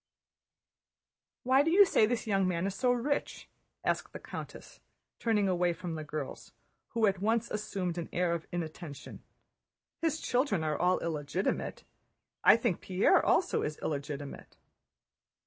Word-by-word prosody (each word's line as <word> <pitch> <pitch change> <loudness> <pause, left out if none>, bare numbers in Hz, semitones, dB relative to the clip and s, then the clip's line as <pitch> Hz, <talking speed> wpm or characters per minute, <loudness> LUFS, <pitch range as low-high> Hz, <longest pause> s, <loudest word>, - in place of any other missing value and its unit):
"Why 260 +2 +5
do 310 - +1
you 395 +4 +7
say 220 - +4
this 240 0 -1
young 195 -3 +2
man 175 0 0
is 195 - -1
so 250 +5 +2
rich?" 250 +4 -2 0.4
asked - - -1
the - - -6
countess, - - -9 0.4
turning 210 -4 +2
away 180 -1 +2
from 175 0 -6
the 155 -1 -4
girls, 150 -2 -6 0.4
who 230 -2 +3
at 195 -2 +1
once 225 +2 +1
assumed 195 -5 -3
an 170 - -5
air 175 -1 +1
of 170 -1 -4
inattention. 160 -3 -6 0.8
"His 320 -1 0
children 245 - +1
are 155 -1 0
all 180 +4 +2
illegitimate. 160 +3 -2 0.6
I - - +8
think 230 -6 -1
Pierre 185 +1 +3
also 370 - +2
is 150 0 -3
illegitimate." 145 -1 -5
185 Hz, 145 wpm, -31 LUFS, 165-230 Hz, 0.8 s, I